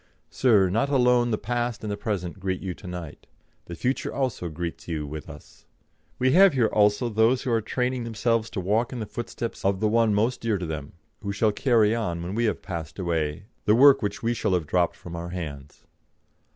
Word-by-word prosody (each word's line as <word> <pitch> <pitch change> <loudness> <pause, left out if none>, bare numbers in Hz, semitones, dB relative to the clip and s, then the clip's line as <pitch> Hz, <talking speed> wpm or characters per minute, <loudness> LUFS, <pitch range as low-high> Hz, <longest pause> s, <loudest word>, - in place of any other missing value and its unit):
Sir, 110 -7 +4
not 115 +8 +1
alone 125 -3 +3
the 110 - 0
past 120 +1 -2
and 105 - -3
the - - -1
present 100 -3 -4
greet 95 -1 -2
you 95 -2 -4
to 90 - -12
night. 90 -4 -8 0.4
The 85 - -7
future 130 +9 -1
also 125 -10 -2
greets 85 +1 -6
you 80 -3 -3
with 75 +2 -7
us. 75 -2 -14 0.5
We 130 +1 +2
have 190 +2 +7
here 125 -4 +3
also 105 +3 +3
those 115 +3 +2
who 125 - -1
are 115 -1 +2
training 125 +3 -1
themselves 115 0 0
to 105 - -4
walk 105 +6 0
in 125 - -5
the 110 - -3
footsteps 120 +1 -6
of 95 -1 +1
the 110 - +2
one 110 -1 +3
most 115 +5 +1
dear 115 -3 0
to 90 - -4
them, 75 -3 -6 0.3
who 100 -2 -3
shall 105 +2 +2
carry 115 -2 +3
on, 90 -8 -2
when 90 +3 -4
we 115 +2 +1
have 110 - -1
passed 85 -5 -6
away, 80 -3 -2 0.2
the 105 - +5
work 135 +2 +7
which 100 0 -3
we 115 +1 +1
shall 95 -5 0
have 85 -3 -1
dropped 85 +3 +1
from 85 -1 -9
our 85 +1 -5
hands. 75 -6 -7
105 Hz, 215 wpm, -25 LUFS, 90-120 Hz, 0.5 s, have